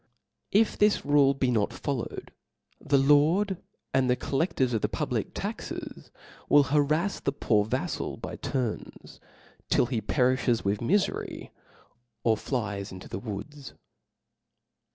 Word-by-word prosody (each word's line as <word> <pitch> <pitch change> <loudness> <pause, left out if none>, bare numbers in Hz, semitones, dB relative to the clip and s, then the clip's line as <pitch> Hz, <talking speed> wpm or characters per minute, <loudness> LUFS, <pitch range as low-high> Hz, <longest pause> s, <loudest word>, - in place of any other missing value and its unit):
If 210 +2 +3
this 210 0 +3
rule 140 -1 +4
be 130 -2 +1
not 110 -4 +1
followed, 135 -5 -4 0.5
the 140 - +3
lord 155 +8 +3 0.3
and 130 -1 +2
the 125 - +4
colleftors 135 -3 0
of 110 - 0
the - - 0
public - - -2
taxes - - -6 0.4
will 145 - +7
harraft 150 +7 +1
the - - +2
poor 105 -6 +1
vaflal 110 - -3
by - - -6
turns, 125 -5 -4 0.5
till - - +4
he 120 -2 -2
perilhes 125 +1 +1
with 100 +1 0
mi 140 +12 +2
fcry, 205 - -2 0.7
or 115 -1 +4
flies 105 -5 -3
into 95 -1 -9
the - - -5
woods. 130 +7 -7
135 Hz, 130 wpm, -28 LUFS, 115-145 Hz, 0.7 s, will